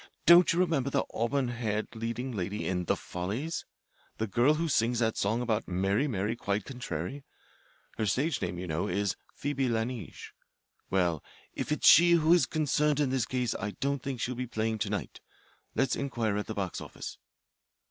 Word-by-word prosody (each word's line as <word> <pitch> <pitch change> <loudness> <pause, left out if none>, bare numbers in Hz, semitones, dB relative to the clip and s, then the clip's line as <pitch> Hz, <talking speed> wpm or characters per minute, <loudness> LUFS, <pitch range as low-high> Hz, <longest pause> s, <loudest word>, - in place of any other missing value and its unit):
Don't 170 +1 +8
you 165 - 0
remember 160 -7 +2
the - - +1
auburn 125 +3 0
haired 110 -3 -2
leading 115 +3 -3
lady 100 -1 -3
in 90 -1 -1
the - - +2
'Follies' 110 - -4 0.5
the 110 - 0
girl 120 +9 +3
who 165 +2 -1
sings 120 -4 +2
that 110 -1 +1
song 110 +5 0
about 115 -2 -1
'Mary, 95 +9 +1
Mary, 105 -2 -1
quite 100 -2 -2
contrary'? 135 +2 -5 0.8
Her 110 - +1
stage 135 - 0
name, 90 - -2
you 90 - -4
know, 80 0 -1
is 100 +1 0 0.2
Phoebe 135 -2 -1
La 110 -1 +1
Neige. 115 -6 -7 0.6
Well, 90 -5 +1 0.3
if - - -4
it's 150 - +2
she 175 +2 +8
who 165 0 +5
is 175 - +4
concerned 150 -1 +1
in 140 -3 +2
this 130 -4 0
case 125 -3 -1
I 105 +1 -4
don't 140 -1 0
think 135 -2 -4
she'll 125 - -1
be 125 0 -4
playing 110 -1 -1
to 105 -1 -1
night. 105 -1 -4 0.5
Let's 135 - +2
inquire 115 -7 -1
at 105 - -3
the 110 - -4
box 95 -3 -3
office." - - -8
120 Hz, 185 wpm, -30 LUFS, 105-140 Hz, 0.8 s, Don't